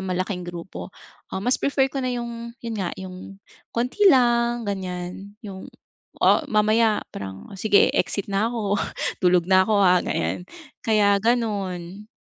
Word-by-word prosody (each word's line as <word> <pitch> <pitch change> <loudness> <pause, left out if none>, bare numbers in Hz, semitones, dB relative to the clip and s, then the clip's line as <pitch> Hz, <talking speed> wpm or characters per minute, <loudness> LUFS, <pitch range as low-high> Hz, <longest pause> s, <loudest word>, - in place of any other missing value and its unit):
malaking 185 -1 -3
grupo, 175 +1 -7 0.4
ah, 190 - -5
mas 250 - +1
prefer 270 -1 +1
ko 275 - -2
na 255 - -1
yung 235 -1 -5
yun 230 -1 -3
nga 180 - -1
yung 190 +1 -9 0.3
konti 245 - -3
lang 240 -4 +3
ganyan 190 0 -5
yung, 190 -2 -8 0.6
o - - +6
mamaya 215 0 +3
parang 95 - -8
sige 205 -1 +4
e-exit 200 0 -1
na 210 +4 +2
ako 210 -4 -1 0.4
tulog 180 -1 +4
na 190 +2 +4
ako, 215 - +3
ah, 180 0 +5
ganyan, 180 - -2 0.3
kaya 205 -2 +3
ganun. 205 -4 -1
205 Hz, 145 wpm, -23 LUFS, 185-235 Hz, 0.6 s, o